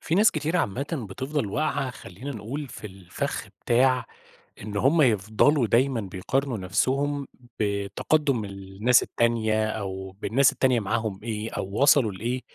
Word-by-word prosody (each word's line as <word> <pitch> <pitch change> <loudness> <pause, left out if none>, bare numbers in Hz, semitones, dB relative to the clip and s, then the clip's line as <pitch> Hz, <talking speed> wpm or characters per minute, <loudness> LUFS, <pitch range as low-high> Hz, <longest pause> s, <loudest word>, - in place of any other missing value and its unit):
في 165 - -1
ناس 210 +3 +6
كتيرة 155 +3 -1
عامةً 135 - -2
بتفضل 130 +4 -2
واقعة 140 +3 -1
خلّينا 125 +3 -9
نقول 130 +5 -5
في 110 - -8
الفَخ 95 -3 -5 0.2
بتاع 125 +1 +3 0.6
إن 105 0 -6
هم 145 +9 +4
يفضلوا 115 +4 +3
دايمًا 125 +2 +2
بيقارنوا 110 +7 -2
نفسهم 135 +9 0 0.3
بتقدُّم 105 +6 0
الناس 100 +4 +1
التانية 110 -2 +1
أو 95 -3 -4
بالناس 130 +6 +3
التانية 130 -3 +2
معاهم 110 -1 -2
إيه، 110 -1 -4
أو - - -3 0.2
وصلوا 140 -6 +5
لإيه؟ 120 +7 -3
115 Hz, 135 wpm, -26 LUFS, 100-140 Hz, 0.6 s, ناس